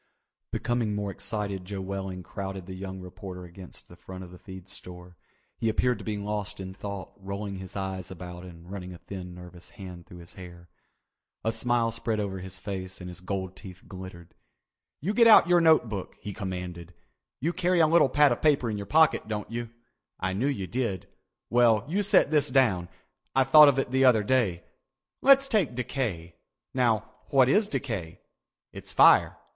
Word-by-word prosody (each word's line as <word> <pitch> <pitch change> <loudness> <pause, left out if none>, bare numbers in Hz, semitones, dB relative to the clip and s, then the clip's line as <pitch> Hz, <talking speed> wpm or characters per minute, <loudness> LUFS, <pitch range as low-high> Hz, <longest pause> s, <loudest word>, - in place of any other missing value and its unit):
Becoming 120 -3 -1
more 100 -1 -2
excited 100 -1 -4
Joe 100 +1 -6
Welling 95 -1 -5
crowded 95 -1 -6
the 95 - -8
young 95 0 -7
reporter 90 0 -9
against 90 +1 -11
the - - -14
front 95 0 -9
of 90 - -11
the 90 - -13
feed 95 -1 -11
store. 90 -2 -11 0.4
He 115 - +1
appeared 120 +1 +1
to - - -9
be 105 -1 -3
lost 105 0 -4
in 95 0 -6
thought, 100 -1 -7
rolling 100 0 -5
his 95 +1 -9
eyes 95 -1 -4
about 90 -1 -8
and 85 0 -12
running 90 -2 -7
a - - -10
thin 90 -1 -8
nervous 90 0 -12
hand 90 -3 -10
through 90 - -12
his 85 0 -12
hair. 85 -2 -12 0.7
A 115 - +1
smile 120 -1 +1
spread 115 -1 -2
over 95 -2 -3
his 95 0 -7
face 95 -1 -6
and 90 -1 -7
his 90 - -10
gold 95 0 -4
teeth 95 -2 -12
glittered. 95 -2 -10 0.7
"You 190 +8 -1
get 230 +1 +6
out 215 -6 +8
your 175 -1 +5
note 160 -6 +5
book," 100 -4 -6
he 105 - -6
commanded. 90 -4 -6 0.4
"You 165 +6 -1
carry 180 +1 +1
a 165 - +6
little 160 -3 +4
pad 145 -1 +5
of 120 - -1
paper 140 -7 +3
in 105 - -3
your 100 -1 -6
pocket, 160 -2 +4
don't 105 -1 -4
you? 120 0 -4 0.5
I 95 0 -1
knew 115 +8 0
you 130 -10 -1
did. 115 -4 -3 0.4
Well, 115 -3 +4
you 190 +7 0
set 200 -6 +4
this 150 -2 +3
down. 110 -10 +2 0.5
I 135 - +5
thought 150 +3 +8
of 135 - +1
it 135 -2 -1
the 130 +1 +3
other 115 -5 +5
day. 100 -8 +1 0.6
Let's 275 0 +6
take 200 - +1
decay. 110 -10 -3 0.4
Now 115 -4 +1 0.2
what 130 -2 +5
is 205 +10 +3
decay? 110 - -4 0.5
It's - - -5
fire. - - +6
100 Hz, 185 wpm, -27 LUFS, 95-125 Hz, 0.7 s, out